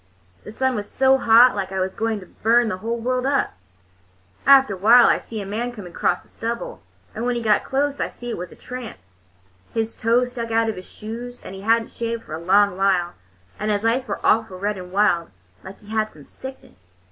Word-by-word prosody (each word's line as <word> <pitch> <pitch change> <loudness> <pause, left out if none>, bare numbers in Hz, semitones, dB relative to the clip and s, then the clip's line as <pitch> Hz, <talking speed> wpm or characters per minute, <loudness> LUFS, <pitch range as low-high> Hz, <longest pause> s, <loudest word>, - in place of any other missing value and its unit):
The - - -10
sun 260 +3 0
was 205 -3 -4
so 265 0 +3
hot 235 +1 +6
like 195 -2 -3
it 190 - -2
was 185 0 -1
going 220 -2 -2
to - - -11
burn 230 +5 +2
the 185 - -3
world 235 +5 -2
up. 280 0 +1 0.9
After 270 -6 +7
a - - -6
while 230 +6 +7
I - - +4
see 220 -2 -7
a - - -8
man 225 +5 -3
coming 200 -7 -10
across 175 - 0
the - - -23
stubble, 235 +1 -5 0.3
and 225 - -5
when 245 0 0
he 240 - -2
got 210 -2 +3
close 280 +1 -1
I - - 0
see 240 -1 -7
it - - -4
was 180 -1 -6
a - - -13
tramp. 250 -2 -8 0.8
His 225 0 -1
toes 245 +2 +1
stuck 235 -2 -5
out 225 0 +2
of 220 - -3
his 185 - -10
shoes, 240 +3 -8
and - - -8
he 195 - -8
had 225 +2 +3
n't - - -15
shaved 230 0 -4
for 155 - -10
a 160 - -4
long 195 +2 +3
while, 185 -3 +1 0.5
and 210 - -2
his 210 +1 0
eyes 240 +3 +1
was - - -2
awful 220 -4 +2
red 205 +1 -2
and 180 0 -9
wild, 190 -4 +2 0.3
like 195 - -10
he 210 - -16
had 215 0 0
some 150 -6 -15
sickness. 95 - -12
225 Hz, 230 wpm, -22 LUFS, 195-240 Hz, 0.9 s, After